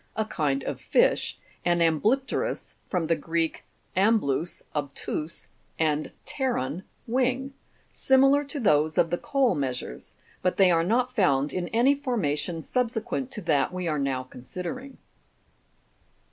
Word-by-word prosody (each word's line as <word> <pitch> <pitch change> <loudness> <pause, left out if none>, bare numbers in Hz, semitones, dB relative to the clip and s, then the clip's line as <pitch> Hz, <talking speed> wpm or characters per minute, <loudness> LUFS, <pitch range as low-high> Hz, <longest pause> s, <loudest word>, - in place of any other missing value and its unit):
a 220 - 0
kind 140 -9 -1
of - - -4
fish), - - +2 0.3
and 175 0 +2
ambly'pterm, 205 - +1 0.2
(from 180 -4 0
the 165 +1 +2
Greek, 165 +1 -1 0.3
amblus, 185 -6 +1
obtuse, 150 +2 -3 0.3
and 155 -1 +1 0.2
pteron, 185 - -1 0.2
wing), 260 +2 0 0.4
similar 270 +2 +4
to 285 +1 -5
those 155 - +3
of 165 -1 +3
the 175 - +1
coal 275 -3 +2
measures; 130 - -4 0.3
but 180 - 0
they 190 -2 +6
are 165 -1 +3
not 245 +7 +1
found 145 - +2
in 180 -1 -2
any 240 +7 +4
formation 175 - -1
subsequent 250 +1 -1
to 225 -5 -4
that 160 -4 +2
we 180 -1 -3
are 155 -2 0
now 135 -2 -1
con 130 -1 -13
sidering. 255 - -6
180 Hz, 135 wpm, -27 LUFS, 150-250 Hz, 0.4 s, they